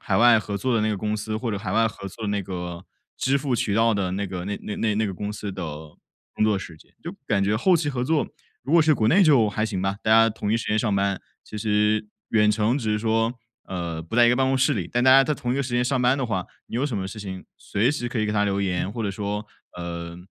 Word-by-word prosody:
海 - - 0
外 120 -1 +6
合 100 -1 -4
作 120 +4 0
的 110 - +2
那 110 - +1
个 105 - -1
公 105 +2 -2
司， 110 +1 -3
或 115 +1 -3
者 100 - -2
海 95 -3 -5
外 115 +2 +3
合 100 -2 -6
作 110 +4 -8
的 - - -1
那 100 -1 -1
个 90 -1 -6 0.3
支 135 +2 +1
付 135 -3 -1
渠 105 -3 0
道 115 0 +3
的 95 -3 -1
那 100 +1 -2
个 90 -1 -5
那 100 - -2
那 105 0 -1
那 110 -1 +1
个 95 - -4
公 105 +3 -4
司 105 -1 -5
的 95 -1 -6 0.7
工 - - -1
作 105 -2 +2
时 85 -4 -9
间。 - - -21
就 170 - -5 0.2
感 100 -3 +2
觉 105 +2 +1
后 180 - +4
期 150 -2 -1
合 125 -3 -2
作， 155 +3 +1 0.4
如 - - -4
果 170 -2 +6
是 155 0 +4
国 110 - +1
内 190 - +5
就 135 - +5
还 110 +1 -1
行 100 -4 -3
吧， 95 +1 -1
大 110 - 0
家 115 0 +6
同 105 -1 -3
一 - - +3
时 115 - -4
间 105 - +2
上 105 -2 +1
班。 100 0 0 0.2
其 105 - -9
实 105 0 +1 0.2
远 105 -1 +4
程 110 +4 +1
只 110 -5 -2
是 105 - +1
说， 115 +1 +1 0.4
呃， 85 -3 -4
不 85 +8 -6
在 120 -1 +7
一 - - +5
个 125 - +2
办 135 0 +2
公 135 0 +2
室 130 - +3
里， 90 -5 -3
但 120 +1 +1
大 130 - +7
家 135 +1 +8
在 150 - 0
同 120 -2 -3
一 - - -1
个 140 - +1
时 130 -2 -6
间 125 0 +2
上 130 +1 0
班 125 +3 +3
的 130 - -1
话， 95 -5 -2 0.2
你 - - -10
有 130 +4 0
什 120 -7 -3
么 95 -1 -3
事 105 +2 -8
情 95 -2 -7
随 115 +7 0
时 120 -5 -3
可 120 - -3
以 110 - +1
给 105 - -1
他 105 -1 +2
留 100 0 0
言， 95 0 -1
或 115 +1 -4
者 100 - -1
说， 105 +1 -4 0.3
呃， 85 -1 -6
110 Hz, 315 characters per minute, -24 LUFS, 100-120 Hz, 0.7 s, 家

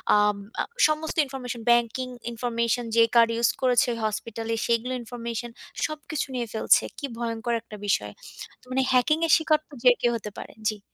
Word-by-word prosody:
আম 210 0 +4 0.3
আ - - 0 0.2
সমস্ত 310 +1 -2
information, 250 -3 -6
banking 240 +2 +1 0.2
information 235 0 -1
যে 230 - +7
card 230 0 +6
use 235 - +4
করেছে 250 -1 +3 0.2
hospital-এ 225 +1 -3
সেইগুলো 235 +2 +1
information 235 0 -5 0.4
সবকিছু 310 -1 -4
নিয়ে 240 -2 -2
ফেলছে। 220 - +4
কি 285 - -4
ভয়ঙ্কর 235 0 -2
একটা 215 -2 -11
বিষয়! 105 - +1 0.5
তো - - -23
মানে 265 +1 +2
hacking-এর 305 +6 +3
শিকার 315 -1 +2
তো - - -19
যে 250 - +8
কেউ 240 - +3
হতে 210 -1 -8
পারে। - - -8 0.2
জি। 215 -1 -5
240 Hz, 165 wpm, -26 LUFS, 230-255 Hz, 0.5 s, যে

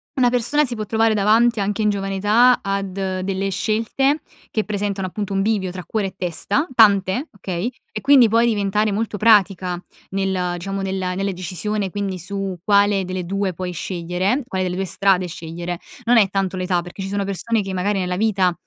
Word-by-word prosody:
una 255 -3 +4
persona 250 +5 +2
si 245 -2 -4
può 215 -1 -4
trovare 225 +1 +2
davanti 220 +3 +3
anche 205 +2 -1
in 210 - +3
giovane 195 -1 -2
età 225 +6 +4
ad 195 -1 -2
delle 190 0 -2
scelte 230 - 0 0.3
che 215 - 0
presentano, 200 -2 -2
appunto, 200 +1 -4
un 195 - +1
bivio 195 -3 0
tra 185 -1 -7
cuore 210 -3 -1
e 190 - -8
testa, 185 - -1
tante, 205 - +4
okay, 195 +3 -4 0.2
e 215 - -5
quindi 270 -2 +6
puoi 230 +2 +4
diventare 210 -1 +1
molto 210 +1 -2
pratica 195 -4 +3 0.3
nel 190 -2 -1
diciamo 195 +2 -4
nella 190 -1 -2
nella 195 +1 -1
decisione, 190 +3 -3
quindi 195 -1 -3
su 195 +1 -4
quale 200 -1 +3
delle 185 0 -4
2 195 +1 -1
puoi 180 +1 -4
scegliere, 180 - -2
quale 190 -4 -2
delle 180 0 -2
2 190 +1 -1
strade 185 0 +2
scegliere, 170 +1 -6 0.3
non 240 +1 +5
è 205 -4 +5
tanto 190 -1 -1
l'età, 180 -1 0
perché 175 +3 -9
ci 190 - -3
sono 200 0 -1
persone 205 +3 -1
che 195 -1 -5
magari 195 +2 0
nella 180 0 -2
vita 195 -4 +2
195 Hz, 190 wpm, -21 LUFS, 185-215 Hz, 0.3 s, quindi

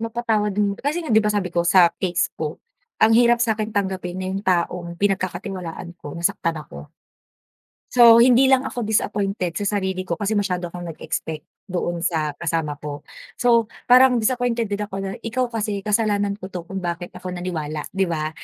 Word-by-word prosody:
mapatawad 225 -2 0
din. 205 -1 +2
Kasi 310 +5 -2
nga, 235 - -2
di 220 - +6
ba, 210 - 0
sabi 200 -4 -1
ko 170 - +2
sa 175 0 +5
case 180 -2 0
ko, 155 +1 -3 0.4
ang 220 +1 +4
hirap 240 +1 +5
sakin 220 -3 0
tanggapin 190 -4 -2
na 185 - -4
yung 195 - -2
taong 175 -2 -1
pinagkakatiwalaan 185 -2 -3
ko 145 +2 -8
nasaktan 165 -1 0
ako. 75 - -10 1.0
So, 235 -1 +8
hindi 250 +2 +6
lang 265 0 +4
ako 245 -4 -4
disappointed 195 -4 -1
sa 205 0 0
sarili 190 -1 -3
ko 170 - -1
kasi 205 +4 -1
masyado 180 -4 -2
akong 175 0 -7
nag-expect 160 -1 -5 0.2
doon 175 -2 -2
sa 160 -3 0
kasama 160 -3 -2
ko. 145 -1 -7 0.3
So, 235 -2 +3 0.2
parang 250 -1 +6
disappointed 240 -1 0
din 205 +1 -2
ako 205 -2 -5
na, 195 - -3
"Ikaw 245 +2 -2
kasi, 210 -3 -2
kasalanan 205 -1 +1
ko 185 - -7
to 180 -2 -5
kung 195 - -5
bakit 175 0 -4
ako 180 0 -6
naniwala." 155 -4 -4
Di 190 -1 0
ba? 155 -2 -2
195 Hz, 180 wpm, -22 LUFS, 175-220 Hz, 1.0 s, So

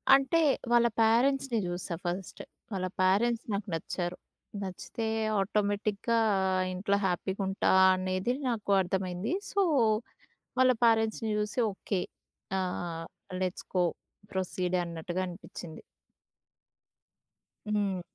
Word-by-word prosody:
అంటే, 275 +4 +2 0.3
వాళ్ళ 240 0 +6
పేరెంట్స్‌ని 245 +3 +3
జూసా 175 0 -3
ఫస్ట్. 180 +2 -4 0.3
వాళ్ళ 185 -1 -1 0.2
పేరెంట్స్ 220 +5 +3
నాకు 200 +1 -2
నచ్చారు. 175 +2 -3 0.5
నచ్చితే 195 +4 -4 0.3
ఆటోమేటిక్‌గా 205 +3 0 0.5
ఇంట్లో 200 +2 +1
హ్యాపీగుంటా 190 +1 0 0.2
అనేది 185 +5 -1 0.2
నాకు 215 -4 -2
అర్థమైంది. 185 - -2 0.2
సో, 400 - +2 1.0
వాళ్ళ 255 0 +6
పేరెంట్స్‌ని 225 -1 +2
చూసి 210 +4 -1
ఓకే. 190 -1 -2 0.6
ఆ! - - +1 0.8
Let's 185 0 -3
go. 180 - +4 0.5
ప్రొసీడే. 185 -1 -1
అన్నట్టుగా 170 +2 -4
అనిపిచ్చింది. 175 -2 -9 2.0
హ్మ్. 195 -3 0
195 Hz, 95 wpm, -30 LUFS, 185-225 Hz, 2.0 s, వాళ్ళ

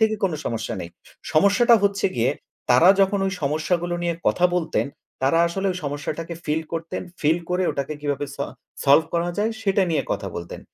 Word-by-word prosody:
থেকে 220 0 +3
কোন 180 - +1
সমস্যা 115 0 -3
নেই। 85 - -6 0.4
সমস্যাটা 205 +8 +5
হচ্ছে 200 0 +2
গিয়ে 115 +1 +2 0.4
তারা 145 +9 +7
যখন 195 +1 +3
ওই 190 - -1
সমস্যাগুলো 165 +4 0
নিয়ে 170 -1 0
কথা 180 - +2
বলতেন, 170 -4 0 0.4
তারা 140 +5 +3
আসলে 195 +3 -2
ওই 180 - -6
সমস্যাটাকে 150 +4 -4
ফিল 155 +1 0
করতেন। 165 0 -4 0.2
ফিল 160 +3 +3
করে 180 +1 +1
ওটাকে 140 +2 -3
কিভাবে 145 -1 -2
স - - -29 0.5
সলভ 145 +3 +6
করা 170 +1 +1
যায়? 215 +2 +1
সেটা 195 -1 +2
নিয়ে 150 -4 +1
কথা 100 - -3
বলতেন। 85 0 -7
165 Hz, 180 wpm, -23 LUFS, 145-190 Hz, 0.5 s, তারা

